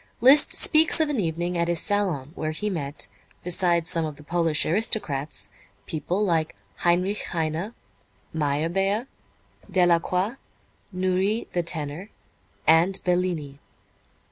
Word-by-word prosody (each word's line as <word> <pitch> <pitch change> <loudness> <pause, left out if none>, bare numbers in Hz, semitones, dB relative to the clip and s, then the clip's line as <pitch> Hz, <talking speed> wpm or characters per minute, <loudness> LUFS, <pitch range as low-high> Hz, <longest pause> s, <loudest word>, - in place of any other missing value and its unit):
Liszt 270 +5 +6
speaks 320 +1 +4
of 315 -2 +2
an 285 -5 -1
evening 175 0 -2
at 170 0 0
his 170 -1 +2
salon 185 -10 -1
where 155 - -4
he 210 +7 -3
met, 145 -5 -3 0.4
besides 175 -1 +1
some 165 -2 +1
of 155 -2 -4
the 150 - -15
Polish 165 -1 0
aristocrats, 155 - 0 0.3
people 175 +6 -2
like 165 -4 0 0.2
Heinrich 180 +4 +1
Heine, 165 +6 -3 0.6
Meyerbeer, 165 - 0 0.6
Delacroix, 180 +5 +1 0.5
Nourrit, 185 +4 -1
the 175 - +1
tenor, 165 +3 -2 0.6
and 170 +4 +5
Bellini. 175 -6 -1
175 Hz, 115 wpm, -24 LUFS, 155-195 Hz, 0.6 s, Liszt